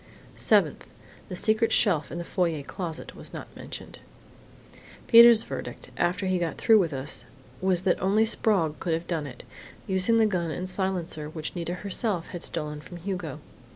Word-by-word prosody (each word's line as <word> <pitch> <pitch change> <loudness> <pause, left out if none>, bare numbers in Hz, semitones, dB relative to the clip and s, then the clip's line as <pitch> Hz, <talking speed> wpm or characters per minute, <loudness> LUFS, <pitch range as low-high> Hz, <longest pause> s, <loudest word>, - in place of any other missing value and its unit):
"Seventh: - - +2 0.4
The 185 - -4
secret 220 +4 +2
shelf 170 -9 +2
in - - -5
the 170 - -3
foyer 170 -5 -1
closet 165 +2 -6
was - - -11
not - - -9
mentioned. - - -9 1.1
"Peter's 235 -1 +8
verdict, - - -7
after 180 +3 0
he 185 -1 +1
got 170 -2 -2
through 220 -1 +5
with 170 -5 +1
us, 135 -2 -3 0.4
was 185 -1 +2
that 185 - +1
only 205 +4 +3
Sprague 195 -8 +1
could 170 - -1
have 165 +1 -5
done 160 -5 -2
it 125 -3 -10 0.4
using 190 +4 +2
the 225 - +5
gun 180 -5 0
and 180 +4 -4
silencer 180 -5 -2
which 155 +1 -5
Nita 175 0 -3
herself 195 -3 -1
had 175 - -6
stolen 150 -3 -3
from 175 - -10
Hugo. 175 -5 -5
180 Hz, 170 wpm, -27 LUFS, 160-195 Hz, 1.1 s, Peter's